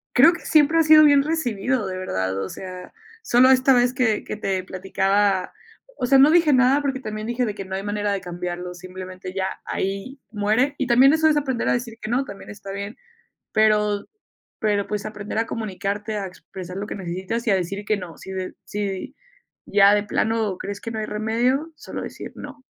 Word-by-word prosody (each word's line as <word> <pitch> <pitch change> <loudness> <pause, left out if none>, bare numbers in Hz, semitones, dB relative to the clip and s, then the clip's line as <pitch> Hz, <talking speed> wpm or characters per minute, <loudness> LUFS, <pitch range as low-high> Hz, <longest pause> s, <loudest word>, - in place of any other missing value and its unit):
creo 310 +7 +8
que 345 - -7
siempre 310 +1 +3
ha - - +6
sido 310 -1 +8
bien 285 -2 +6
recibido, 255 -7 -1
de 185 -1 -4
verdad, 95 - -2
o 95 - -4
sea, 185 -1 -9 0.3
solo 255 - +5
esta 260 +1 +5
vez 245 0 +3
que 245 -5 +1
que - - -5
te 190 -3 -2
platicaba, 195 +1 0 0.5
o - - -2
sea, 270 +2 +5
no 280 +3 +7
dije 330 -3 +5
nada 260 +2 +4
porque 270 -2 -1
también 215 -3 -5
dije 240 +1 0
de 210 - -3
que 200 -1 -6
no 190 0 -5
hay 195 - -5
manera 205 0 -1
de 200 - -1
cambiarlo, 180 0 -5
simplemente 185 0 -8
ya 190 -1 -1 0.2
ahí 195 +8 -4
muere, 220 +7 +1
y 270 - -1
también 260 +3 +6
eso 315 0 +4
es 305 - +3
aprender 265 -5 0
a - - +3
decir 240 -2 -3
que 215 - -4
no, 255 +3 +1
también 200 -6 -10
está 200 -1 -8
bien, 200 +2 -6 0.6
pero 210 -1 +2 0.5
pero, 205 -2 +1
pues, 210 -1 -3
aprender 210 0 -5
a 225 - +1
comunicarte, 210 0 -3
a 195 - -3
expresar 185 0 -9
lo 200 +1 -4
que - - -6
necesitas, 190 +5 -4
y - - +4
a 195 - +4
decir 195 +3 -3
que 215 - +1
no, 180 -4 -8
si - - -11
de 185 -1 -5
si 200 -2 -4 0.5
ya 200 0 +5
de 205 0 +1
plano 215 -1 0
crees 200 0 -6
que 230 - -6
no 220 - -3
hay 215 - -3
remedio, 240 +9 0
solo - - -7
decir - - -7
no. 280 -1 -10
210 Hz, 210 wpm, -23 LUFS, 195-255 Hz, 0.6 s, creo